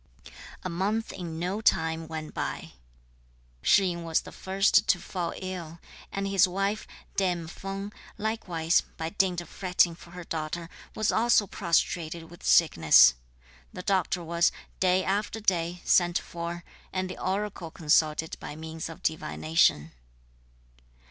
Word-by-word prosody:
A - - -2
month 200 +6 -1
in 170 -4 -6
no 185 +5 -2
time 160 -5 +1
went 155 -1 -6
by. - - -4 0.9
Shih 195 -2 +4
yin 170 0 -6
was 165 -1 +1
the - - -11
first 195 +1 +2
to - - +4
fall 175 -1 -4
ill, 175 -3 -6 0.3
and 195 0 -2
his 195 -1 +4
wife, 195 +3 -2 0.3
Dame 180 -4 0
Feng, 195 +4 -6 0.2
likewise, 180 -7 +1 0.2
by 160 0 -3
dint 185 -2 +1
of 175 - -12
fretting 180 -2 +2
for 170 +1 -14
her 180 +1 -8
daughter, 165 +1 -4 0.3
was 215 - +1
also 225 -2 +4
prostrated 170 -3 -1
with 175 - -13
sickness. 80 - +6 0.6
The 180 - -7
doctor 190 -2 0
was, 170 +1 +2 0.3
day 185 0 +3
after 205 +3 -1
day, 175 -4 0
sent 175 -1 +4
for, 170 0 -5 0.3
and 185 0 -2
the 185 - -8
oracle 195 -3 -2
consulted 155 0 +1
by - - -7
means 160 +1 -6
of 165 +2 -11
divination. 155 - +1
175 Hz, 140 wpm, -28 LUFS, 165-195 Hz, 0.9 s, sickness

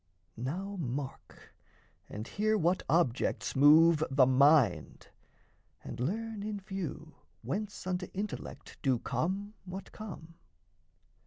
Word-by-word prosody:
Now 185 - -4
mark, 135 -1 -6 0.6
and 105 +3 -6
hear 215 +1 +1
what 175 0 +2
objects 145 -6 +1
move 155 +3 +6
the 135 -1 +5
mind, 130 - +3 0.7
And - - -7
learn, 215 - -2
in 210 0 -4
few, 175 -5 -6 0.3
whence 205 0 -4
unto 180 -1 -2
intellect 205 +2 -6
Do 130 -3 +2
come 195 - -2
what 190 +1 -8
come. 175 -6 -9
170 Hz, 105 wpm, -31 LUFS, 135-200 Hz, 0.7 s, move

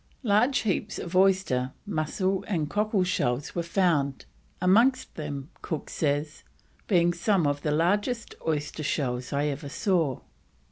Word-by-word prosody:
Large 245 +4 +3
heaps 200 -5 -1
of 175 +1 -5
oyster, 185 -10 +3
mussel, 185 +1 -1
and 165 -7 0
cockle 210 +2 +1
shells 145 -7 -1
were 170 - -1
found, 170 -6 +1 0.3
amongst 235 +9 +3
them, 145 -2 -5 0.4
says 145 0 -1
Cook, - - -35
"being 175 -3 +3
some 175 0 +1
of 145 0 0
the 150 - -1
largest 205 - 0
oyster 150 0 -1
shells 125 -4 -2
I 145 0 0
ever 145 0 -3
saw." 165 - 0
170 Hz, 135 wpm, -27 LUFS, 145-195 Hz, 0.4 s, Large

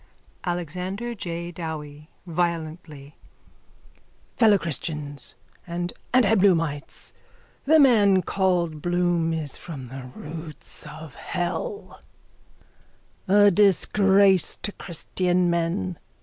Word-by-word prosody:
_ - - -2
ALEXANDER 180 +7 -4
J 170 -4 -5
DOWIE: 155 -3 -7 0.2
(Violently.) 160 -4 -3 1.2
Fellowchristians 160 - 0 0.3
and 175 0 -3 0.2
antiBloomites, 185 - +2 0.5
the 315 +3 +6
man 205 -9 +5
called 175 -5 0
Bloom 175 -1 +1
is 155 -4 -4
from 135 -8 -8
the 130 0 -8
roots 155 -1 -8
of 155 -1 -10
hell, 185 - -4 1.3
a 205 +1 +6
disgrace 195 0 +4
to 205 - -1
christian 180 0 -1
men. 165 - -1
175 Hz, 85 wpm, -25 LUFS, 155-190 Hz, 1.3 s, the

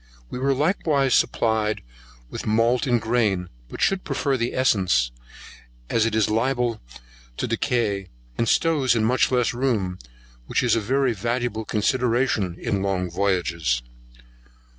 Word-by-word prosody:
We 125 - -4
were 135 +1 +1
likewise 145 - +1
supplied 110 -1 +1 0.5
with - - -6
malt 115 +4 +2
in 120 -1 +3
grain, 110 -6 0 0.2
but - - -8
should 195 -1 +2
prefer 140 -2 -1
the 120 -1 -2
essence, 95 - +2 0.8
as 115 0 +2
it 110 - -2
is 110 -2 +3
less 110 - +1
liable 120 -2 0 0.6
to - - -1
decay, 100 -6 -1 0.3
and 115 - 0
stows 150 -7 +2
in 110 -1 +1
much 125 +3 +2
less 125 -2 +1
room, 110 -8 -1 0.5
which - - 0
is 120 -3 +3
a - - +2
very 130 +3 +1
valuable 115 +1 -2
consideration 120 -4 0
in 100 - -1
long 95 -2 -1
voyages. 85 -9 0
115 Hz, 140 wpm, -23 LUFS, 100-125 Hz, 0.8 s, in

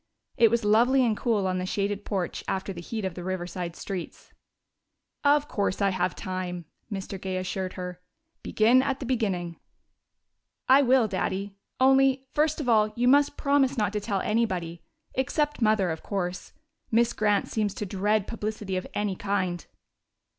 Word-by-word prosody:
It 230 -3 +5
was 235 0 0
lovely 245 +5 +4
and 225 -2 +1
cool 215 -4 0
on 185 -1 0
the 180 - -2
shaded 200 +1 -2
porch 190 -4 -3
after 195 +1 -2
the 175 - -8
heat 215 +3 -4
of 190 - -2
the 175 - -7
Riverside 180 -1 -4
streets. 185 -4 -7 0.9
"Of 290 0 +4
course 200 -2 -1
I 200 -1 +2
have 185 -1 -1
time," 180 -2 -4 0.3
Mr. 195 -1 -5
Gay 190 -1 -3
assured 185 0 -3
her. 180 -1 -7 0.4
"Begin 235 +4 +4
at 270 0 -1
the 265 - -5
beginning." 195 -9 -1 1.1
"I 265 +2 +7
will, 255 -3 +4
Daddy. 195 0 -3 0.2
Only, 270 0 +4
first 305 +1 +1
of 290 - -3
all, 215 -2 +4
you 245 +1 +1
must 285 +2 +4
promise 280 -1 +2
not 210 -2 0
to 210 - 0
tell 200 -2 -2
anybody 185 -7 -1 0.3
except 295 +2 -1
Mother, 215 -5 +3
of 160 - -5
course. 180 -3 -4 0.4
Miss 235 +1 +3
Grant 210 -2 +1
seems 210 -3 -1
to 210 - -4
dread 205 +2 0
publicity 210 -4 -4
of 185 - -4
any 205 -2 -1
kind." 185 -3 -2
205 Hz, 165 wpm, -27 LUFS, 185-240 Hz, 1.1 s, I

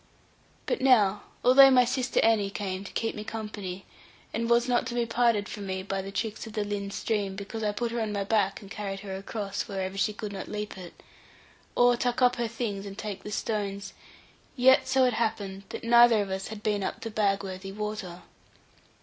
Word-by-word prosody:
But - - -1
now, 210 -7 +4 0.2
although 270 +2 +9
my 250 -2 +6
sister 255 +1 0
Annie 220 -3 +3
came 195 -1 -4
to 200 - -9
keep 225 - -1
me 210 - -6
company, 210 -4 -6 0.5
and 230 +1 -1
was 235 +1 +4
not 245 0 +1
to 240 - -4
be 240 -1 +1
parted 230 -3 +2
from 205 -2 -6
me 190 0 -3
by 195 0 -2
the 195 +1 -7
tricks 220 +2 -3
of 220 - -10
the 215 -1 -1
Lynn 205 -1 -3
stream, 200 -1 -2
because 200 +3 -6
I 210 -1 +1
put 235 +3 -2
her 235 0 -2
on 215 -1 -2
my 200 -1 -1
back 200 -1 0
and 200 - -13
carried 195 -2 -5
her 195 -2 -6
across, 200 0 -4
whenever 190 0 -3
she 205 +2 +2
could 210 -1 -6
not 190 - -6
leap 210 0 -5
it, 180 -3 -11 0.7
or 245 0 +5
tuck 245 +1 0
up 250 -1 +4
her 240 -1 0
things 215 -3 -4
and 195 0 -8
take 210 -3 -5
the 210 - -8
stones; 200 -2 -3 0.6
yet 260 +1 +5
so 260 0 +3
it 250 - +2
happened 205 -4 -2
that - - -6
neither 235 -1 +6
of 195 - -7
us 190 0 -3
had 215 -1 -8
been 210 -2 0
up - - -4
the 225 - -5
Bagworthy 195 -2 -1
water. 210 -4 -5
210 Hz, 210 wpm, -28 LUFS, 195-230 Hz, 0.7 s, although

